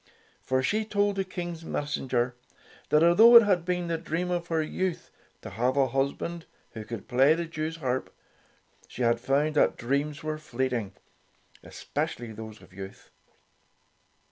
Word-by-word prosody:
For 130 Hz, 0 st, 0 dB
she 215 Hz, +10 st, +1 dB
told 205 Hz, -1 st, 0 dB
the 195 Hz, -, +1 dB
King's 175 Hz, -3 st, -6 dB
messenger 130 Hz, -6 st, -1 dB, 0.6 s
that 150 Hz, +1 st, +4 dB
although 220 Hz, +8 st, +7 dB
it 235 Hz, -, +11 dB
had 190 Hz, -5 st, +2 dB
been 180 Hz, 0 st, -1 dB
the 165 Hz, -1 st, -2 dB
dream 175 Hz, +2 st, -2 dB
of 175 Hz, -1 st, -2 dB
her 160 Hz, -2 st, 0 dB
youth 185 Hz, +3 st, -3 dB, 0.3 s
to -, -, -7 dB
have 125 Hz, +7 st, 0 dB
a 135 Hz, -2 st, +3 dB
husband 140 Hz, +6 st, -2 dB, 0.2 s
who 110 Hz, -, -7 dB
could 115 Hz, -2 st, -7 dB
play 135 Hz, +5 st, +4 dB
the 170 Hz, 0 st, -3 dB
Jewsharp, 155 Hz, -5 st, -3 dB, 0.8 s
she 125 Hz, -, -5 dB
had 115 Hz, 0 st, +2 dB
found 140 Hz, +5 st, +1 dB
that -, -, +3 dB
dreams 140 Hz, +5 st, -2 dB
were 155 Hz, 0 st, -3 dB
fleeting 125 Hz, -7 st, -2 dB, 0.4 s
— -, -, -31 dB
especi -, -, -4 dB
ally 120 Hz, -2 st, -7 dB
those 110 Hz, 0 st, -10 dB
of -, -, -18 dB
youth. 95 Hz, 0 st, -10 dB
150 Hz, 160 wpm, -27 LUFS, 125-170 Hz, 0.8 s, it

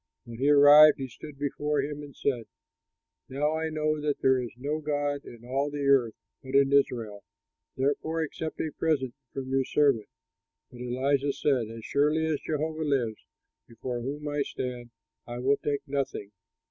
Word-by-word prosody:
When 120 Hz, -1 st, -10 dB
he 140 Hz, +2 st, +2 dB
arrived, 145 Hz, +1 st, +8 dB
he 135 Hz, -, -4 dB
stood 140 Hz, +4 st, -11 dB
before 145 Hz, +1 st, -1 dB
him 145 Hz, +1 st, -5 dB
and 145 Hz, -2 st, -11 dB
said, 120 Hz, -5 st, -1 dB, 0.8 s
"Now 150 Hz, +4 st, 0 dB
I 160 Hz, 0 st, -1 dB
know 155 Hz, -1 st, -1 dB
that 145 Hz, -1 st, -1 dB
there 130 Hz, -1 st, +3 dB
is 120 Hz, -, -5 dB
no 145 Hz, +4 st, -2 dB
god 145 Hz, -1 st, -2 dB
in 120 Hz, 0 st, -12 dB
all 135 Hz, +3 st, -1 dB
the 145 Hz, -1 st, -3 dB
earth, 130 Hz, -5 st, +3 dB, 0.3 s
but 130 Hz, 0 st, -6 dB
in 140 Hz, 0 st, +4 dB
Israel; 115 Hz, -7 st, +1 dB, 0.5 s
therefore 155 Hz, +4 st, 0 dB
accept 160 Hz, +1 st, -5 dB
a 155 Hz, -, -2 dB
present 140 Hz, -6 st, 0 dB, 0.2 s
from 135 Hz, -1 st, -5 dB
your 135 Hz, 0 st, +2 dB
servant." 135 Hz, -5 st, +2 dB, 0.6 s
But 125 Hz, -1 st, -11 dB
Elisha 135 Hz, +3 st, 0 dB
said, 130 Hz, -7 st, 0 dB
"As 115 Hz, -1 st, -9 dB
surely 150 Hz, +3 st, +2 dB
as 155 Hz, -3 st, 0 dB
Jehovah 155 Hz, +1 st, -3 dB
lives, 130 Hz, -7 st, -1 dB, 0.4 s
before 120 Hz, +1 st, -5 dB
whom 145 Hz, +4 st, -5 dB
I 145 Hz, 0 st, -1 dB
stand, 125 Hz, -3 st, -4 dB, 0.4 s
I 120 Hz, 0 st, -5 dB
will 135 Hz, +3 st, +2 dB
take 145 Hz, -1 st, -2 dB
nothing." 135 Hz, -7 st, -3 dB
140 Hz, 170 wpm, -28 LUFS, 125-150 Hz, 0.8 s, arrived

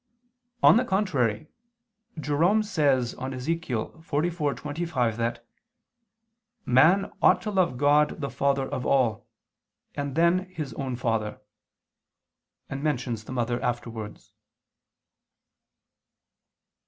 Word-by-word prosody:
On -, -, +8 dB
the 245 Hz, -, +3 dB
contrary, 155 Hz, -, 0 dB, 0.7 s
Jerome 165 Hz, +9 st, +2 dB
says 140 Hz, -, +1 dB
on 130 Hz, +1 st, -5 dB
Ezech. 165 Hz, +7 st, -3 dB
44:25 145 Hz, -1 st, -2 dB
that 115 Hz, 0 st, -2 dB, 1.2 s
"man 160 Hz, +11 st, +4 dB
ought -, -, +5 dB
to 215 Hz, -, -3 dB
love 185 Hz, -10 st, +1 dB
God 145 Hz, +3 st, +3 dB
the 140 Hz, -2 st, -3 dB
Father 140 Hz, -1 st, 0 dB
of 130 Hz, -, -4 dB
all, 120 Hz, -6 st, +1 dB, 0.7 s
and 140 Hz, -2 st, -4 dB
then 175 Hz, +3 st, +2 dB
his 155 Hz, -9 st, -6 dB
own 130 Hz, 0 st, -4 dB
father," 115 Hz, -3 st, -2 dB, 1.3 s
and 135 Hz, -, -5 dB
mentions 125 Hz, -7 st, -2 dB
the -, -, -9 dB
mother 120 Hz, -1 st, -1 dB
afterwards. 115 Hz, -3 st, -5 dB
140 Hz, 100 wpm, -26 LUFS, 120-165 Hz, 1.3 s, On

